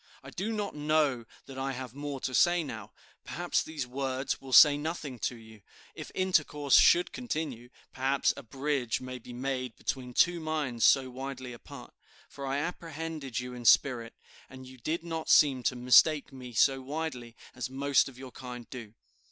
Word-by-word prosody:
"I - - -10
do 200 +5 -3
not 210 -2 -3
know 150 -5 +1 0.2
that 135 -1 -9
I 135 0 -2
have 130 -2 -7
more 145 0 -5
to 130 - -3
say 175 +4 +4
now; 110 -8 -7 0.3
perhaps 175 +2 -1
these 155 -4 -5
words 130 +1 -3
will 135 -1 -10
say 145 +3 +9
nothing 145 -4 -5
to 120 - -2
you. 110 -2 -15 0.3
If - - -8
intercourse 155 -6 +2
should 175 +1 +5
continue, 155 - -4 0.2
perhaps 135 +1 +1
a - - -8
bridge 135 -1 -2
may 130 0 -7
be 125 - -12
made 130 -1 -3
between 125 -2 -4
two 175 0 +3
minds 150 -7 -1
so 130 -2 +4
widely 130 -1 -6
apart; 120 - -12 0.4
for 140 -1 -7
I 135 +1 -1
apprehended 160 -4 -4
you 125 0 -6
in 125 -1 -8
spirit, 115 0 +3 0.3
and 130 0 -11
you 130 0 -13
did 160 +7 -3
not 165 -2 -5
seem 135 -4 +5
to 125 - +1
mistake 135 +4 +4
me 125 -2 -9
so 135 +3 +3
widely 130 -4 -5 0.2
as 125 0 -5
most 140 0 +2
of 130 - -15
your 130 -1 -10
kind 125 -2 -9
do. 115 -4 -9
135 Hz, 175 wpm, -29 LUFS, 125-150 Hz, 0.4 s, say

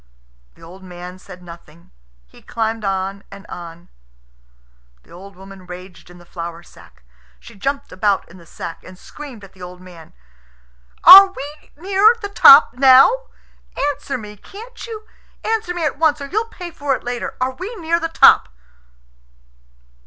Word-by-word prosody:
The - - -20
old 180 +4 -14
man 180 0 -11
said 180 -2 -14
nothing; 170 -1 -16 0.3
he - - -20
climbed 225 -1 -4
on 195 0 -3
and 195 0 -13
on. 170 0 -11 1.2
The - - -24
old 195 +2 -13
woman 190 0 -14
raged 180 0 -12
in 175 - -15
the 175 - -18
flour 170 -1 -8
sack. 60 - -20 0.4
She - - -15
jumped 275 +7 -4
about 200 +1 -1
in 185 +2 -16
the 170 - -18
sack, 165 - -9
and 185 0 -14
screamed 260 -1 -12
at 195 - -15
the 185 - -19
old 180 0 -10
man, 180 -3 -15 0.9
"Are 385 +4 +11
we 300 -5 -11
near 395 +6 +3
the 405 -3 -6
top 285 -10 +7
now? 260 - +6 0.8
Answer 275 -1 -6
me, 210 -3 -11
can't 455 - -12
you! 435 -2 -9 0.4
Answer 435 -5 -2
me 340 -2 -2
at 285 -1 -3
once, 310 -2 +1
or 280 - -7
you'll 430 +10 -2
pay 360 -6 -10
for 285 -4 -2
it - - -10
later. 245 0 -5
Are 255 +1 -1
we 380 - -8
near 335 -3 -1
the 330 -1 -4
top?" 325 - +5
210 Hz, 165 wpm, -18 LUFS, -, 1.2 s, Are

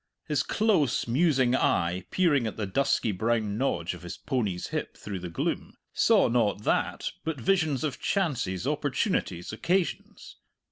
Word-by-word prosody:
His - - +1
close, 200 - +1
musing 130 -1 +3
eye, 90 -5 +1
peering 145 -10 +2
at 110 - -5
the 105 - -1
dusky 110 +2 +1
brown 110 +1 0
nodge 90 -11 0
of 90 - -10
his 90 -1 -7
pony's 105 -10 -2
hip - - -4
through 100 -3 -6
the 90 0 -6
gloom, 85 - -3 0.2
saw - - +4
not 110 -3 +1
that, - - 0
but 160 -4 -3
visions 155 -1 +1
of 150 -3 -2
chances, 125 - -1
opportunities, 145 - -1
occasions. 175 +10 -2
120 Hz, 145 wpm, -28 LUFS, 100-150 Hz, 0.2 s, saw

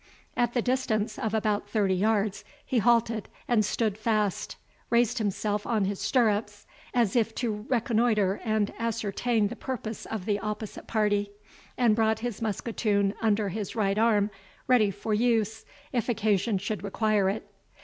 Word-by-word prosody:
At 240 0 +1
the 240 - +2
distance 230 -4 0
of 220 -4 -1
about 210 -1 0
thirty 205 -3 +2
yards 205 +1 +1 0.2
he 250 - +1
halted 230 -1 +2 0.2
and 230 -3 +3
stood 210 0 -1
fast, 215 -3 0 0.3
raised 235 +1 +2
himself 210 0 -1
on 220 -4 +1
his 195 0 -2
stirrups, 210 -1 +1 0.3
as 235 -4 +1
if 225 -2 +1
to 220 -2 -3
reconnoitre 225 -5 +2
and 215 -2 0
ascertain 225 -1 0
the 240 - -6
purpose 235 -4 -5
of 215 -5 -4
the 205 -1 0
opposite 210 +1 -5
party, 205 -2 +1 0.5
and 235 -4 +4
brought 220 -1 +2
his 240 -3 -4
musketoon 210 -2 0
under 215 -2 +2
his 205 0 -4
right 205 -2 +1
arm, 215 -2 +3 0.3
ready 245 -5 +4
for 205 +2 -3
use, 220 -1 +1 0.3
if 245 -2 -1
occasion 215 -2 +1
should 200 +1 -3
require 205 -1 +1
it. 200 - -3
215 Hz, 150 wpm, -28 LUFS, 205-230 Hz, 0.5 s, and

